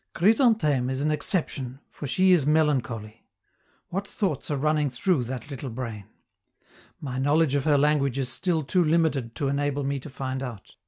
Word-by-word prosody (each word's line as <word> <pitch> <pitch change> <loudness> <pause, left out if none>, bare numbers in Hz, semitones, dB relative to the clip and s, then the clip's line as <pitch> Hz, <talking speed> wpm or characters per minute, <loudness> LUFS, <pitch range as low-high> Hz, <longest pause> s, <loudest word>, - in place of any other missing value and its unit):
Chrysantheme 195 - +3
is 130 +1 -2
an 155 +1 +1
exception, 145 -5 -1
for 145 - -7
she 185 +7 +3
is 175 -5 +5
melancholy. 125 -8 0 0.7
What 195 +2 -3
thoughts 185 - -2
are 145 - 0
running 150 0 +1
through 130 +2 0
that 130 +3 -6
little 135 0 -5
brain? 115 -4 -6 0.9
My 130 -3 -4
knowledge 145 +2 +2
of 140 -2 0
her 150 -2 +4
language 140 -2 +2
is 135 -2 0
still 160 +6 0
too 180 +6 +2
limited 155 -7 +1
to 140 - -1
enable 145 0 -1
me 140 0 -1
to 145 - -10
find 130 -1 -4
out. 120 -7 -8
140 Hz, 170 wpm, -26 LUFS, 130-155 Hz, 0.9 s, is